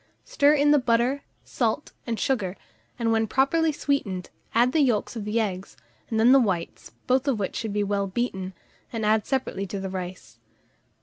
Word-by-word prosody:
Stir 290 +1 +4
in 290 0 +4
the 295 - +6
butter, 245 +3 +1 0.2
salt, - - -1 0.2
and 230 -2 -2
sugar, 200 -8 -1 0.4
and 230 -1 0
when 225 0 +2
properly 310 +7 +2
sweetened, 215 -12 -2 0.2
add 240 +2 +4
the 315 - +2
yolks 245 -5 +1
of 220 -3 -5
the 210 +2 0
eggs, 195 -6 -3 0.3
and 220 - 0
then 235 +3 +6
the 270 - +8
whites, 185 -8 -2
both 260 +2 +2
of 265 -5 +2
which 200 -2 -3
should 225 -2 -3
be 205 0 0
well 200 0 0
beaten, 190 -3 -3 0.4
and 225 -2 -2
added 215 0 +2
separately 245 -7 -2
to 195 +2 -4
the 190 -1 -4
rice. 185 -1 -7
225 Hz, 185 wpm, -25 LUFS, 195-265 Hz, 0.4 s, the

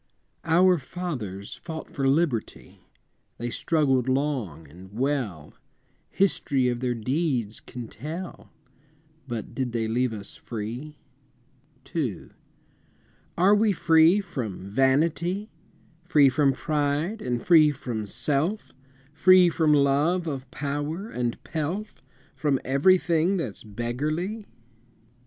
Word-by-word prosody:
I. 165 - -1
Our 180 0 +5
fathers 125 - -5
fought 160 -2 -7
for 135 -1 -1
Liberty, 135 -5 -1 0.6
They 120 +1 -4
struggled 135 -4 +1
long 130 - -1
and 90 +6 -14
well, 115 - -2 0.6
History 140 -9 +1
of 120 -1 -2
their 125 -1 -1
deeds 125 -2 -1
can 120 -3 -8
tell 160 - -7 0.8
But 115 -4 -5
did 130 -3 -3
they 115 -2 -1
leave 125 +2 0
us 105 -2 -7
free? 120 +7 -6 1.0
II. 130 - -2 1.1
Are 185 +4 +5
we 210 0 +3
free 165 +2 +5
from 120 - -5
vanity, 165 - +1 0.5
Free 150 -5 +5
from 135 +1 +2
pride, 150 +8 -1
and 120 -1 -3
free 160 -4 +7
from 120 -7 -4
self, 145 - -2 0.4
Free 180 +3 +6
from 160 -2 +2
love 150 +5 +3
of 135 -5 -5
power 145 +9 -4
and 120 -1 -2
pelf, 170 +7 -4 0.3
From 145 -4 +1
everything 170 +5 +3
that's 130 - -5
beggarly? 150 - -3
145 Hz, 110 wpm, -26 LUFS, 120-170 Hz, 1.1 s, free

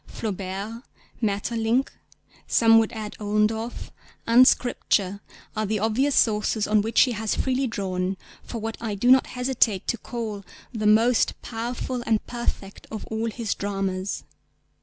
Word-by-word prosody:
Flaubert, 200 +2 -5 0.4
Maeterlinck 225 +4 0 0.6
(some 225 -1 +6
would 225 - 0
add 215 -2 -6
Ollendorff) 215 +2 -1 0.3
and 245 +3 +7
Scripture, 200 -5 +1 0.3
are 215 -1 -1
the 215 +1 0
obvious 225 +7 +1
sources 210 -1 +2
on 215 0 +3
which 225 +2 +3
he 255 - +4
has 220 -2 -1
freely 260 0 0
drawn 190 -3 -2 0.2
for 235 - -7
what 225 0 -4
I 220 -3 -2
do 245 +6 +3
not 260 0 +6
hesitate 250 -6 0
to 235 - 0
call 220 -4 -5 0.3
the 215 -2 0
most 225 +3 +3
powerful 240 +2 -4
and 220 -2 +1
perfect 235 -5 -5
of 220 - -6
all 220 +1 -1
his 225 -2 -2
dramas. 195 -1 -3
220 Hz, 140 wpm, -25 LUFS, 205-235 Hz, 0.6 s, and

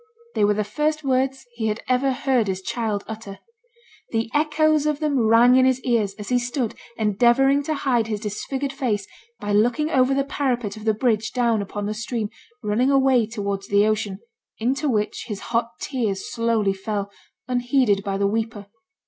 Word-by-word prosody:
They 210 - +1
were 205 0 +3
the 210 - 0
first 300 +9 -1
words 265 0 0
he 230 -2 -2
had 215 +1 -2
ever 255 +2 +2
heard 255 -4 +1
his 190 -1 -3
child 215 -3 -2
utter. 215 -3 -7 0.7
The 225 0 -2
echoes 305 0 +2
of 300 -1 0
them 280 -7 +1
rang 235 +3 +6
in 260 - +5
his 260 -1 +3
ears 220 -6 0
as 210 -1 -8
he 250 -1 +3
stood 245 -1 -2 0.2
endeavouring 240 +6 +3
to 310 - -1
hide 245 -5 +1
his 215 -2 -2
disfigured 265 +6 -3
face 220 -8 -1 0.3
by 205 - -3
looking 245 +9 +2
over 260 0 +3
the 275 - +2
parapet 245 -7 -2
of 215 0 -10
the 220 -1 +2
bridge 220 -2 0
down 235 -4 +2
upon 205 +1 -4
the 210 - -2
stream 215 0 -3 0.3
running 225 +6 +2
away 265 -4 +4
towards 200 -3 -4
the 205 +1 +4
ocean, 210 -2 -1 0.4
into 270 +6 0
which 210 -3 -1
his 210 -4 -4
hot 230 0 +2
tears 220 -8 -2
slowly 230 -4 +1
fell, 200 +1 -4 0.4
unheeded 245 -5 +2
by 195 -2 -2
the 200 - +1
weeper. 220 0 -2
230 Hz, 180 wpm, -23 LUFS, 210-265 Hz, 0.7 s, rang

